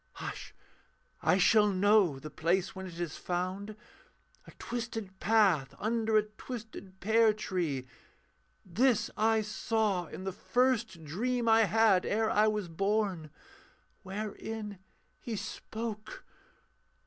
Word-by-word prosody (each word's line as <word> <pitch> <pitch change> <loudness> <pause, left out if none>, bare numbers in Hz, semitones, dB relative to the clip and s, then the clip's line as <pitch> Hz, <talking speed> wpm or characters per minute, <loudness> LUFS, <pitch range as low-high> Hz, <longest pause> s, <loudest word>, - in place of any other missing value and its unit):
Hush - - -7 0.7
I - - +3
shall 210 +2 +5
know 200 -5 +4
The 150 +3 -9
place 180 +6 0
when 190 0 -6
it 170 -2 -10
is 170 -3 -3
found: 185 +4 -3 0.7
a - - -11
twisted 225 -5 -5
path 175 - +3
Under 220 0 +1
a 215 - +4
twisted 215 -3 -9
pear 220 +2 +4
tree 170 -11 -2 0.8
this 225 +4 +2
I 220 +1 +3
saw 210 -4 0
In 185 - -8
the 190 - -2
first 230 -5 0
dream 235 - -1
I 225 0 +6
had 215 -3 +4
ere 220 +1 +1
I 215 +1 +4
was 210 -3 -1
born, 195 -2 -1 0.7
Wherein 210 +1 -6 0.4
He 230 - -5
spoke.... 220 - -6
210 Hz, 120 wpm, -31 LUFS, 185-225 Hz, 0.8 s, I